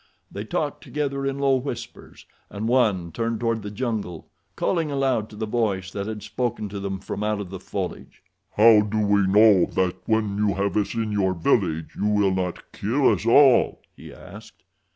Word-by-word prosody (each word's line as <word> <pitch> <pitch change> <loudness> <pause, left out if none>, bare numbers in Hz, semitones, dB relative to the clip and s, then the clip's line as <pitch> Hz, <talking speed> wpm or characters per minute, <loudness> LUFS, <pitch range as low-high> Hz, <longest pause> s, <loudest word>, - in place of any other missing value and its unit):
They - - -6
talked - - -3
together 140 -2 -3
in 135 0 -2
low 135 -1 +2
whispers, 125 -3 -8 0.2
and 105 +2 -4
one 105 -9 +1
turned 115 +5 -2
toward 115 -1 -1
the 105 - -6
jungle, 105 -7 -4 0.3
calling 165 -4 0
aloud 135 -6 0
to - - -12
the 110 +1 -3
voice 105 -5 -1
that 100 0 -4
had 110 -1 -6
spoken 120 -4 -3
to 100 0 -6
them 100 -1 -4
from 100 - -5
out 105 -1 -1
of 95 -3 -7
the 95 - -6
foliage. 95 0 -6 0.3
"How 110 0 +7
do 105 +1 -3
we 100 -2 +2
know 105 -2 +6
that 95 -1 -1
when 110 -2 0
you 105 -3 +1
have 100 +1 -1
us 105 0 -1
in 110 -2 -2
your 95 -2 0
village 80 -1 0
you 105 - -1
will 105 -2 +2
not 90 -2 -4
kill 130 +7 +1
us 105 +3 -4
all?" 130 +1 +5
he - - -12
asked. - - -14
105 Hz, 190 wpm, -24 LUFS, 100-115 Hz, 0.3 s, How